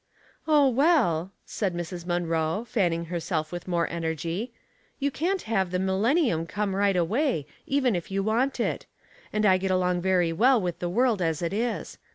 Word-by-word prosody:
" -, -, -32 dB
Oh, 295 Hz, -3 st, +5 dB
well," 250 Hz, -, +2 dB, 0.2 s
said 195 Hz, -5 st, -2 dB
Mrs. 175 Hz, 0 st, -5 dB
Munroe, 170 Hz, +3 st, -1 dB
fanning 175 Hz, -7 st, 0 dB
herself 165 Hz, -2 st, -3 dB
with 175 Hz, 0 st, -6 dB
more 170 Hz, -2 st, +1 dB
energy, 170 Hz, -, -3 dB, 0.5 s
*'you 280 Hz, 0 st, -1 dB
can't 360 Hz, +7 st, -1 dB
have 195 Hz, -5 st, 0 dB
the 180 Hz, -, -1 dB
millen« 190 Hz, -, +1 dB
nium 165 Hz, -, +1 dB
come 205 Hz, -2 st, -2 dB
right 200 Hz, -1 st, +2 dB
away, 190 Hz, -, +1 dB, 0.2 s
even 265 Hz, -6 st, +2 dB
if 175 Hz, -, -4 dB
you 195 Hz, 0 st, -1 dB
want 235 Hz, +6 st, 0 dB
it; -, -, -2 dB, 0.4 s
and 215 Hz, 0 st, 0 dB
I 185 Hz, -2 st, +5 dB
get 190 Hz, +1 st, -2 dB
along 180 Hz, -1 st, +1 dB
very 180 Hz, -2 st, +2 dB
well 245 Hz, +7 st, +4 dB
with 180 Hz, -4 st, -3 dB
the 175 Hz, -, -2 dB
world 230 Hz, +1 st, +2 dB
as 165 Hz, -1 st, -1 dB
it 170 Hz, -, -1 dB
is. 230 Hz, +3 st, -3 dB
190 Hz, 185 wpm, -26 LUFS, 170-235 Hz, 0.5 s, Oh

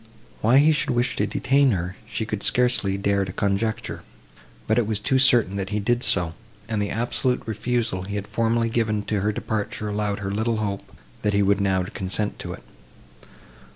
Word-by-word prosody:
Why 115 Hz, +5 st, +5 dB
he 150 Hz, +3 st, +6 dB
should 150 Hz, -, +1 dB
wish 125 Hz, 0 st, +1 dB
to -, -, +1 dB
detain 140 Hz, +1 st, +2 dB
her, 90 Hz, 0 st, -3 dB
she 115 Hz, -1 st, -3 dB
could 105 Hz, -1 st, -4 dB
scarcely 120 Hz, -6 st, +2 dB
dare 100 Hz, 0 st, +1 dB
to 95 Hz, -, -5 dB
conjecture; 100 Hz, +3 st, -1 dB, 0.6 s
but 110 Hz, -, +2 dB
it 115 Hz, -, 0 dB
was 110 Hz, -2 st, 0 dB
too 130 Hz, +5 st, +1 dB
certain 120 Hz, -7 st, +4 dB
that 95 Hz, -1 st, -3 dB
he 105 Hz, +1 st, -1 dB
did 120 Hz, +4 st, +1 dB
so, 90 Hz, -8 st, +3 dB, 0.3 s
and 110 Hz, -2 st, -1 dB
the 100 Hz, -, -1 dB
absolute 125 Hz, +2 st, -1 dB
refusal 110 Hz, -2 st, -1 dB
he 100 Hz, +2 st, -5 dB
had 100 Hz, -1 st, -3 dB
formerly 115 Hz, +1 st, 0 dB
given 110 Hz, -2 st, 0 dB
to 105 Hz, -1 st, -1 dB
her 105 Hz, +2 st, +1 dB
departure 105 Hz, 0 st, -3 dB
allowed 105 Hz, -1 st, -1 dB
her 100 Hz, -1 st, -4 dB
little 110 Hz, +2 st, 0 dB
hope, 100 Hz, -2 st, -4 dB, 0.3 s
that 105 Hz, -, 0 dB
he 100 Hz, 0 st, +3 dB
would 100 Hz, +1 st, +2 dB
now 95 Hz, -2 st, +2 dB
consent 95 Hz, +3 st, -3 dB
to -, -, -5 dB
it. -, -, -11 dB
105 Hz, 190 wpm, -24 LUFS, 100-115 Hz, 0.6 s, he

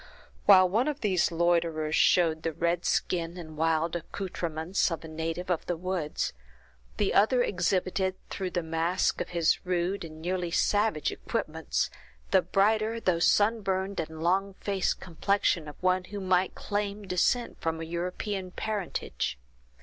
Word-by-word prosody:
While 185 Hz, -2 st, +8 dB
one 225 Hz, +9 st, +1 dB
of 295 Hz, -1 st, -2 dB
these 185 Hz, -6 st, +2 dB
loiterers 165 Hz, -2 st, +1 dB
showed 165 Hz, -3 st, +4 dB
the 165 Hz, 0 st, -2 dB
red 170 Hz, +2 st, 0 dB
skin 170 Hz, 0 st, 0 dB
and 155 Hz, -3 st, -8 dB
wild 160 Hz, +1 st, +1 dB
accouterments 175 Hz, 0 st, -2 dB
of 165 Hz, -1 st, -4 dB
a -, -, -7 dB
native 165 Hz, +3 st, -3 dB
of 170 Hz, -, -1 dB
the 175 Hz, -, -1 dB
woods, 180 Hz, -3 st, -2 dB, 0.6 s
the 205 Hz, -, +1 dB
other 245 Hz, +5 st, +4 dB
exhibited, 185 Hz, 0 st, 0 dB, 0.2 s
through 190 Hz, -2 st, -3 dB
the 175 Hz, -2 st, -2 dB
mask 165 Hz, +3 st, 0 dB
of -, -, -4 dB
his 170 Hz, -2 st, +1 dB
rude 180 Hz, +2 st, -1 dB
and 155 Hz, -1 st, -9 dB
nearly 175 Hz, +1 st, -2 dB
savage 205 Hz, -2 st, +1 dB
equipments, -, -, -2 dB, 0.4 s
the -, -, +6 dB
brighter, 215 Hz, +3 st, +2 dB
though 180 Hz, -6 st, +1 dB
sun 215 Hz, +6 st, +3 dB
burned 195 Hz, 0 st, -1 dB
and 160 Hz, 0 st, -5 dB
long 190 Hz, +3 st, +1 dB
faced 195 Hz, -2 st, -1 dB
complexion 175 Hz, -2 st, 0 dB
of 150 Hz, -, -8 dB
one 185 Hz, 0 st, +2 dB
who 205 Hz, +2 st, -6 dB
might 185 Hz, -1 st, +1 dB
claim 205 Hz, 0 st, -3 dB
descent 195 Hz, +6 st, 0 dB
from 165 Hz, 0 st, -1 dB
a 165 Hz, -, -4 dB
European 180 Hz, +3 st, -3 dB
parentage. 190 Hz, -, -3 dB
180 Hz, 150 wpm, -28 LUFS, 165-195 Hz, 0.6 s, While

